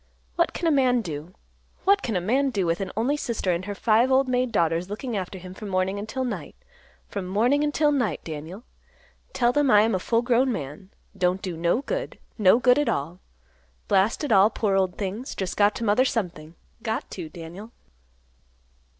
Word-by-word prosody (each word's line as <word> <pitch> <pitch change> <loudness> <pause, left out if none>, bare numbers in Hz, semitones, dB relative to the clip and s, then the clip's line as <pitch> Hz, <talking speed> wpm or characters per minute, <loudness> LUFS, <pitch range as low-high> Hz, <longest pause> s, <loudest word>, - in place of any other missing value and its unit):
What - - +2
can - - -4
a - - +4
man 255 -4 +3
do; 165 -1 -7 0.5
what 400 +1 +4
can 225 - -2
a - - +2
man 260 +9 +1
do, 200 -7 -1
with 165 +2 0
an 195 - -3
only 250 +6 +1
sister 235 -9 -2
and 175 +1 -2
her 205 0 -5
five 230 +5 +3
old 265 0 +4
maid 250 -1 0
daughters 170 -2 +1
looking 225 +3 -4
after 190 -1 -4
him 185 0 -10
from 205 +2 -8
morning 190 +1 0
until 220 +6 -3
night, 245 - -5 0.5
from 195 -3 -5
morning 240 +10 +2
until 295 0 +2
night, 245 - 0
Daniel? 160 +7 -7 0.7
Tell 240 - +2
them 290 +1 +2
I 210 -4 +7
am 225 +1 +2
a 185 - +1
full 230 +5 +1
grown 250 +2 +2
man; 155 - -6 0.3
don't 185 0 +1
do 185 -3 -5
no 170 +10 0
good; - - -4 0.2
no 205 +1 +6
good 250 +2 +4
at 295 - +1
all. 165 +6 -3 0.7
Blast 200 +8 +2
it 295 - -2
all; 200 0 +6
poor 210 -3 0
old 190 -2 +1
things, 210 +6 -4
just 190 -2 -3
got 205 0 +3
to - - -4
mother 215 +4 +3
something; 175 -10 -3 0.3
got 225 +4 -3
to, 170 -4 -6
Daniel." 175 +7 -10
210 Hz, 195 wpm, -25 LUFS, 185-250 Hz, 0.7 s, I